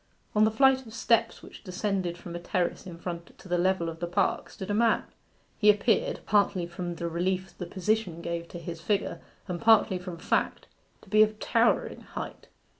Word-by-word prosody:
On 215 Hz, 0 st, +5 dB
the -, -, +4 dB
flight 260 Hz, +2 st, +3 dB
of 220 Hz, -, -10 dB
steps, 230 Hz, -1 st, +1 dB
which -, -, -12 dB
descended 185 Hz, -2 st, -2 dB
from 175 Hz, -1 st, -8 dB
a -, -, -3 dB
terrace 175 Hz, +1 st, -2 dB
in 170 Hz, -2 st, -8 dB
front 170 Hz, 0 st, -7 dB
to -, -, -14 dB
the 175 Hz, -1 st, +1 dB
level 185 Hz, -1 st, +2 dB
of 165 Hz, 0 st, -6 dB
the 175 Hz, -, -2 dB
park, 180 Hz, +2 st, 0 dB
stood 190 Hz, +1 st, -6 dB
a -, -, +1 dB
man. 225 Hz, +1 st, +3 dB, 0.6 s
He 210 Hz, -, +5 dB
appeared, 210 Hz, +1 st, +2 dB
partly 200 Hz, -3 st, +2 dB
from 175 Hz, 0 st, -5 dB
the 170 Hz, 0 st, -3 dB
relief 185 Hz, +3 st, -2 dB
the 180 Hz, -, -6 dB
position 190 Hz, -1 st, -1 dB
gave 170 Hz, 0 st, -4 dB
to 175 Hz, -, -8 dB
his 170 Hz, -1 st, -7 dB
figure, 205 Hz, +3 st, -1 dB, 0.3 s
and 180 Hz, -2 st, -4 dB
partly 220 Hz, -5 st, +5 dB
from 180 Hz, -1 st, -7 dB
fact, -, -, 0 dB, 0.4 s
to -, -, -17 dB
be 215 Hz, +1 st, +5 dB
of 215 Hz, 0 st, +4 dB
towering -, -, +1 dB
height. -, -, -8 dB
185 Hz, 195 wpm, -28 LUFS, 170-210 Hz, 0.6 s, On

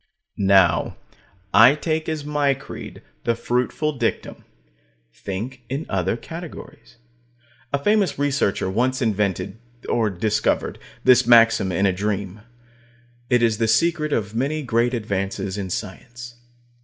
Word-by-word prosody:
Now, 95 Hz, -3 st, +3 dB, 0.6 s
I 120 Hz, +6 st, +7 dB
take 155 Hz, +1 st, -2 dB
as 155 Hz, -2 st, -4 dB
my 145 Hz, -2 st, +1 dB
creed 135 Hz, -, -10 dB, 0.2 s
the 115 Hz, -, +1 dB
fruitful 125 Hz, +5 st, -1 dB
dictum: -, -, -3 dB, 0.7 s
Think 115 Hz, +7 st, -6 dB
in 140 Hz, +5 st, -3 dB
other 95 Hz, +3 st, 0 dB
categories. 165 Hz, +5 st, -10 dB, 0.8 s
A 140 Hz, -, +1 dB
famous 205 Hz, +6 st, +1 dB
researcher 140 Hz, -9 st, 0 dB
once 125 Hz, +7 st, 0 dB
invented 105 Hz, -2 st, -1 dB, 0.3 s
or 115 Hz, -2 st, +1 dB
discovered 105 Hz, +3 st, -1 dB, 0.2 s
this 125 Hz, -1 st, +5 dB
maxim 115 Hz, -5 st, +5 dB
in 95 Hz, +3 st, +1 dB
a 95 Hz, -, +3 dB
dream. 100 Hz, 0 st, -3 dB, 0.9 s
It 125 Hz, -2 st, +3 dB
is 115 Hz, -2 st, +2 dB
the 115 Hz, -, +2 dB
secret 155 Hz, +6 st, +1 dB
of 105 Hz, -5 st, -1 dB
many 140 Hz, +6 st, -1 dB
great 120 Hz, 0 st, +1 dB
advances 100 Hz, -3 st, -3 dB
in 100 Hz, -2 st, -4 dB
science. 120 Hz, +6 st, -7 dB
115 Hz, 125 wpm, -22 LUFS, 100-140 Hz, 0.9 s, I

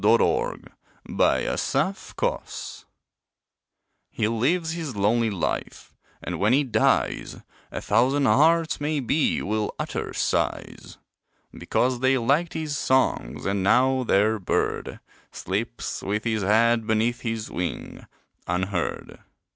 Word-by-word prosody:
THE 110 Hz, +3 st, +6 dB
LONELY -, -, 0 dB, 0.5 s
DREAMER -, -, 0 dB, 1.7 s
He 105 Hz, -, -1 dB
lives 155 Hz, +9 st, 0 dB
his 160 Hz, -7 st, -5 dB
lonely 110 Hz, +3 st, +2 dB
life, 95 Hz, -5 st, -4 dB, 0.3 s
and -, -, -4 dB
when 105 Hz, +4 st, +3 dB
he 145 Hz, +2 st, +4 dB
dies 110 Hz, -5 st, +1 dB, 0.3 s
A -, -, -5 dB
thousand 130 Hz, +6 st, +2 dB
hearts 160 Hz, +3 st, +3 dB
maybe 145 Hz, 0 st, 0 dB
will 105 Hz, +1 st, -2 dB
utter -, -, -4 dB
sighs; -, -, -2 dB, 0.6 s
Because 125 Hz, 0 st, 0 dB
they 130 Hz, +1 st, +3 dB
liked 140 Hz, +8 st, +1 dB
his 155 Hz, -2 st, -3 dB
songs, 130 Hz, -, 0 dB
and 100 Hz, 0 st, 0 dB
now 130 Hz, +6 st, +3 dB
their 110 Hz, 0 st, +2 dB
bird 95 Hz, -, -2 dB, 0.3 s
Sleeps -, -, -4 dB
with 105 Hz, +2 st, -2 dB
his 110 Hz, -2 st, -1 dB
head 110 Hz, +3 st, +3 dB
beneath 115 Hz, +2 st, +1 dB
his 115 Hz, -2 st, -4 dB
wing, 90 Hz, -1 st, -5 dB, 0.4 s
unheard. 90 Hz, 0 st, -2 dB
115 Hz, 110 wpm, -25 LUFS, 105-135 Hz, 1.7 s, THE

